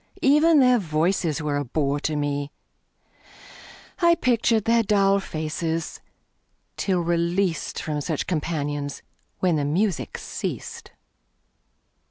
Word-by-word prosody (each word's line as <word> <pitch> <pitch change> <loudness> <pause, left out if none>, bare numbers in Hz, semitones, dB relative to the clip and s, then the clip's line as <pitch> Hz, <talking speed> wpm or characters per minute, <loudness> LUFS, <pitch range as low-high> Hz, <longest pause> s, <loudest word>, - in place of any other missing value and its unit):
Even 300 +3 +5
their 250 -1 +5
voices 160 -2 0
were 145 -1 -1
a 145 - -1
bore 140 +2 -1
to 155 +1 -2
me; 145 0 -2 1.5
I 340 -2 +5
pictured 230 -5 +1
their 230 0 +4
dull 200 -2 +3
faces, 160 -1 -4 0.7
till 185 -3 0
released 170 0 0
From 150 -1 -3
such 155 0 -2
companions, 145 -4 -3 0.4
when 180 -4 +2
the 145 - 0
music 180 +5 -1
ceased. - - -6
165 Hz, 110 wpm, -24 LUFS, 150-200 Hz, 1.5 s, Even